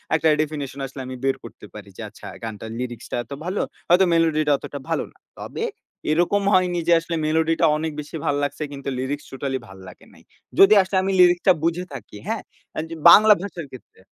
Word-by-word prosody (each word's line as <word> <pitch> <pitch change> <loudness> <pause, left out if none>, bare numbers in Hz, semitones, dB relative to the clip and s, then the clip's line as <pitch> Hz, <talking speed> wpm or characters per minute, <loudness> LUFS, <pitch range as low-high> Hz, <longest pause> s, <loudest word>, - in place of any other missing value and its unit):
একটা 160 - +2
ডেফিনিশন 145 -3 -4
আসলে 135 0 -9
আমি 130 - -6
বের 135 0 +2
করতে - - -12
পারি - - -10
যে, - - -7
"আচ্ছা, - - -12 0.2
গানটার 110 0 -6
লিরিক্সটা 120 -2 -5
এত - - -26
ভালো, 185 +3 -1 0.3
হয়তো 180 +2 +6
মেলোডিটা 155 -2 +2
অতটা 140 - -8
ভালো - - 0
না।" - - -28 0.2
তবে - - -5 0.5
এরকম 175 +5 +2
হয়নি 180 -1 +2
যে 170 - +6
আসলে 165 0 -4
মেলোডিটা 160 +1 +2
অনেক 160 +1 -3
বেশি 150 +2 -7
ভাল 145 -2 +1
লাগছে, 145 +2 -3
কিন্তু 140 -1 -6
লিরিক্স 140 +3 -3
টোটালি 135 0 -3
ভাল 95 - -13
লাগে 90 - -14
নাই। - - -19 0.4
যদি 195 +2 +8
আসলে 190 0 -2
আমি 195 - 0
লিরিক্সটা 180 +1 +5
বুঝে 170 +2 0
থাকি, 115 -5 -9
হ্যাঁ? 225 0 -2 0.3
আন - - -1
যদি 165 - -7
বাংলা 215 +5 +9
ভাষার 180 -5 -6
ক্ষেত্রে। 125 -6 -14
155 Hz, 195 wpm, -22 LUFS, 135-175 Hz, 0.5 s, বাংলা